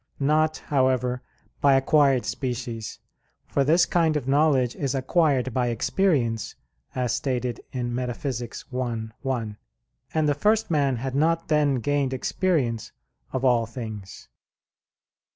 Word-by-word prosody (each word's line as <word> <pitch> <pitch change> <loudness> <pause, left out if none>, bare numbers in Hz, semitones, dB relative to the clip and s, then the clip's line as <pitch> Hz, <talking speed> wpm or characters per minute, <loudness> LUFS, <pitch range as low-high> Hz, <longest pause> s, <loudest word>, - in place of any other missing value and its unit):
Not, 155 +2 +2
however, 130 -2 0 0.4
by 140 -1 +5
acquired 135 -1 +3
species; 120 -2 -4 0.5
for 140 - +1
this 165 +5 +4
kind 165 -3 +2
of 135 -3 -5
knowledge 135 -3 +3
is 140 -1 -2
acquired 135 -2 +1
by 125 0 +1
experience, 120 - 0 0.4
as 125 -2 0
stated 125 -3 -2
in 120 -2 -3
Metaph. 125 +1 -3 0.3
i, 115 -3 -3
1; 110 -5 -2 0.6
and 155 -1 +2
the 145 - +3
first 210 +7 +1
man 140 -4 +2
had 130 +2 -4
not 165 +4 +1
then 150 -3 +3
gained 135 +2 0
experience 130 - -1 0.4
of 130 0 -1
all 120 -3 +3
things. 110 -4 -8
130 Hz, 125 wpm, -25 LUFS, 120-145 Hz, 0.6 s, by